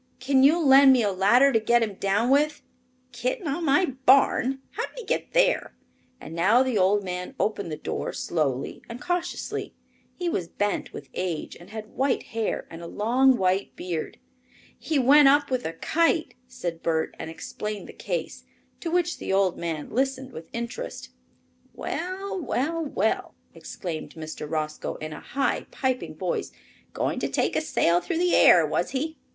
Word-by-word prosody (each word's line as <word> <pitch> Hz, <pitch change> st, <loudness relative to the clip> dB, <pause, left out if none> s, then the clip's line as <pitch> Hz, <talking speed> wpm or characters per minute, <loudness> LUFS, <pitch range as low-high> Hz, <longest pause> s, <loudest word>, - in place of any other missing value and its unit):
Can 265 Hz, +1 st, +3 dB
you 295 Hz, +6 st, +6 dB
lend 275 Hz, -3 st, +7 dB
me 250 Hz, -3 st, +3 dB
a 205 Hz, -, +1 dB
ladder 240 Hz, +9 st, +4 dB
to 225 Hz, -, +4 dB
get 235 Hz, +2 st, +3 dB
him 215 Hz, -3 st, -3 dB
down 200 Hz, +6 st, +1 dB
with?" 295 Hz, +2 st, +2 dB, 0.5 s
"Kitten -, -, -3 dB
on 295 Hz, +4 st, -2 dB
my 310 Hz, +6 st, +4 dB
barn? 265 Hz, -1 st, +3 dB
How -, -, -3 dB
did -, -, -21 dB
he -, -, -7 dB
get -, -, -2 dB
there?" -, -, +2 dB, 0.4 s
and 155 Hz, -, -9 dB
now 200 Hz, +10 st, +4 dB
the 260 Hz, -3 st, -1 dB
old 200 Hz, +1 st, +3 dB
man 180 Hz, +6 st, -5 dB
opened 200 Hz, -5 st, -1 dB
the 155 Hz, -, -4 dB
door -, -, -4 dB
slowly 140 Hz, -5 st, -2 dB
and 235 Hz, +1 st, -7 dB
cautiously. 355 Hz, +3 st, -3 dB, 0.4 s
He 355 Hz, -, -3 dB
was 180 Hz, -, -1 dB
bent 205 Hz, +3 st, -2 dB
with 135 Hz, -, -9 dB
age 180 Hz, -4 st, -3 dB
and 175 Hz, +2 st, -14 dB
had 215 Hz, 0 st, -8 dB
white 265 Hz, 0 st, 0 dB
hair 225 Hz, -1 st, -2 dB
and 165 Hz, 0 st, -9 dB
a 170 Hz, -, -7 dB
long 250 Hz, +7 st, +3 dB
white 190 Hz, +1 st, 0 dB
beard. 170 Hz, -3 st, -4 dB, 0.6 s
"He 315 Hz, -, -2 dB
went 275 Hz, +2 st, +7 dB
up 285 Hz, 0 st, +4 dB
with 255 Hz, -1 st, -1 dB
a 165 Hz, -, -5 dB
kite," 330 Hz, -, +1 dB
said 180 Hz, -10 st, -5 dB
Bert, 160 Hz, -1 st, 0 dB
and -, -, -5 dB
explained 210 Hz, +5 st, -6 dB
the -, -, -10 dB
case, -, -, -4 dB, 0.4 s
to 335 Hz, -, -4 dB
which 350 Hz, 0 st, 0 dB
the -, -, -4 dB
old 190 Hz, -2 st, +2 dB
man 160 Hz, -3 st, -4 dB
listened 265 Hz, +1 st, -1 dB
with 165 Hz, -7 st, -10 dB
interest. 235 Hz, -, -5 dB, 0.7 s
"Well! 375 Hz, +2 st, -4 dB
well! 325 Hz, +3 st, -1 dB
well!" 290 Hz, -, -1 dB, 0.2 s
exclaimed 165 Hz, -4 st, -7 dB
Mr. 155 Hz, -2 st, -7 dB
Roscoe, 155 Hz, -1 st, -3 dB
in 155 Hz, 0 st, -6 dB
a -, -, -8 dB
high 275 Hz, +1 st, -1 dB
piping 260 Hz, -, -2 dB
voice. 180 Hz, +2 st, -3 dB, 0.4 s
"Going -, -, -2 dB
to -, -, -2 dB
take -, -, 0 dB
a -, -, +2 dB
sail 175 Hz, -, +2 dB
through 340 Hz, -, -3 dB
the 355 Hz, +1 st, +2 dB
air, -, -, +7 dB
was -, -, -1 dB
he? 310 Hz, +4 st, -3 dB
245 Hz, 175 wpm, -26 LUFS, 180-285 Hz, 0.7 s, lend